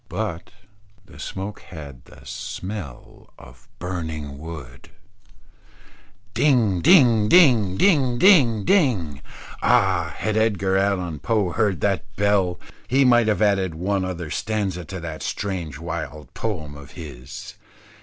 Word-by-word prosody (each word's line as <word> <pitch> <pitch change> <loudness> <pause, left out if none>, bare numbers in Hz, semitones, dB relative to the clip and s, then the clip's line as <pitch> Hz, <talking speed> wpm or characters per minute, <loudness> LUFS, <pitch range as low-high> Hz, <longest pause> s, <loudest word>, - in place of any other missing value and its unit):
But 85 0 -4 0.6
the - - -16
smoke 100 +2 -6
had 70 -7 -11
the - - -17
smell 90 - -8
of 60 +1 -16
burning 80 -6 -5
wood. 75 -5 -10 1.4
Ding, 115 - +2
ding, 120 - +5
ding, 120 - +5
ding, 135 - +3
ding, 125 - +5
ding. 110 - +1 0.4
Ah! 85 -4 +2
had 110 -1 -2
Edgar 100 -4 +1
Allan 95 -5 0
Poe 105 +1 0
heard 100 -2 0
that 100 -2 +1
bell, 100 -3 +1 0.3
he 135 +2 +3
might 120 -2 +5
have 110 0 +2
added 95 -5 +1
one 95 +3 -1
other 90 -4 -5
stanza 100 -5 -2
to 95 +4 -7
that 80 -2 -6
strange 90 -8 -4
wild 80 -4 -6
poem 85 -10 -4
of 70 -2 -12
his. 60 +1 -9
95 Hz, 125 wpm, -23 LUFS, 80-110 Hz, 1.4 s, ding